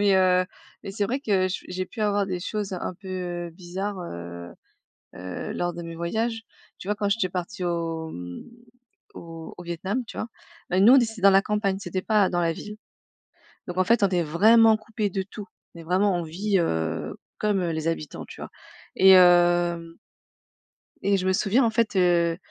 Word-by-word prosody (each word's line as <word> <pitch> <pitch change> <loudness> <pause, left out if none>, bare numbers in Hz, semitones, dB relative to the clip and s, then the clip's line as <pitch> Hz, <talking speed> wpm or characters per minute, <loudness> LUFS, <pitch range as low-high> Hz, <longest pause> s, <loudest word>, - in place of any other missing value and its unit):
mais 200 -1 +4
heu, 185 -1 +4 0.4
mais 195 - -6
c'est 205 +1 -1
vrai 260 +7 -2
que 190 -7 +1
je 185 - -5
j'ai 185 0 -3
pu 230 - -9
avoir 205 -1 +1
des 180 -2 -3
choses 205 0 -4
un 185 0 -4
peu 180 -3 -5
bizarres, 185 +3 -5
heu 85 - -8 0.6
heu, 90 0 -6
lors 175 0 -2
de 170 - -7
mes 165 0 -7
voyages, 225 +7 -2 0.3
tu 185 - -11
vois? 210 - 0
Quand 205 -1 -1
j'étais 200 -3 +1
partie 180 +1 -5
au, 165 -2 -2
mmh, 90 0 -8 0.7
au 165 -1 -9
au 180 - -9
Vietnam, 190 +8 -3
tu - - -10
vois? 220 - -3 0.4
Ben, 185 +2 +3
nous 240 +5 +8
on - - +8
d 240 - +5
c'était 225 -3 -8
dans 195 0 +7
la 195 0 +6
campagne, 205 -2 -1
c'était 190 -1 -4
pas 210 -1 +2
dans 175 -1 0
la 165 -1 +1
ville, 210 +5 -9 0.9
donc 180 +1 -6
en 185 - +4
fait, 235 +3 +3
on 195 - +4
est 175 -2 +1
vraiment 220 +8 +5
coupé 215 -1 -3
de 190 +1 -2
tout, 205 +1 -9 0.3
on 170 - -10
est - - -9
vraiment 185 +3 +2
on 175 - -2
vit, 195 +6 -1
heu, 80 - -2 0.2
comme, 210 -2 +1
heu, 170 -2 -1
les 160 0 -3
habitants, 155 -3 -4
tu - - -12
vois? - - -7 0.5
Et 190 0 +7
hem 175 -2 +4 1.0
et 200 0 +2
je 185 - -2
me 190 - +3
souviens, 215 +7 +2
en 230 - +2
fait, 220 -2 0
heu, 170 -2 +3
185 Hz, 205 wpm, -25 LUFS, 170-205 Hz, 1.0 s, nous